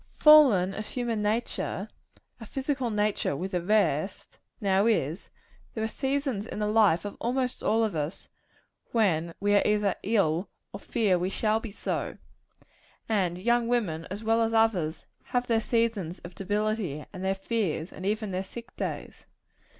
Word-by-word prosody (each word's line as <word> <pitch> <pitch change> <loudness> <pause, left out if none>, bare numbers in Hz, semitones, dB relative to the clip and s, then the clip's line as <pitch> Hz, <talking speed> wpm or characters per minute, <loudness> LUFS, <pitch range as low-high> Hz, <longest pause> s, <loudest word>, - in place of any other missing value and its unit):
Fallen 260 - +7
as 215 +1 -5
human 235 -4 -2
nature 215 +3 -1 0.5
our 225 - -9
physical 265 -1 -2
nature 210 -8 0
with 185 +7 -4
the 180 -2 0
rest 190 -3 0 0.2
now 200 -1 +2
is, 170 -6 0 0.5
there 220 - -2
are - - +1
seasons 265 -4 -2
in - - -6
the 210 - 0
lives 210 -5 +3
of 205 - -5
almost 250 +1 -1
all 225 +2 +2
of 215 -5 -1
us, 150 +3 -4 0.7
when 170 -7 +1
we 205 +1 +2
are 205 - +6
either 210 -2 +2
ill, 190 -4 +1 0.2
or - - -6
fear 200 -6 +1
we 180 +2 -1
shall 215 +2 +1
be 225 -2 -7
so. - - -3 0.9
And 185 -6 +1
young 235 +4 +2
women, 190 -10 -1
as 200 +4 -6
well 225 +1 +3
as 225 0 +1
others, 190 -8 +1 0.2
have 245 0 0
their 230 -2 +2
seasons 225 -8 0
of 175 - -9
debility, 205 -5 -2
and 185 -1 -6
their 190 0 +1
fears, 195 -5 -2
and - - -9
even 210 +1 -1
their 185 +1 -2
sick 230 +4 -10
days. - - -5
210 Hz, 165 wpm, -28 LUFS, 185-230 Hz, 0.9 s, Fallen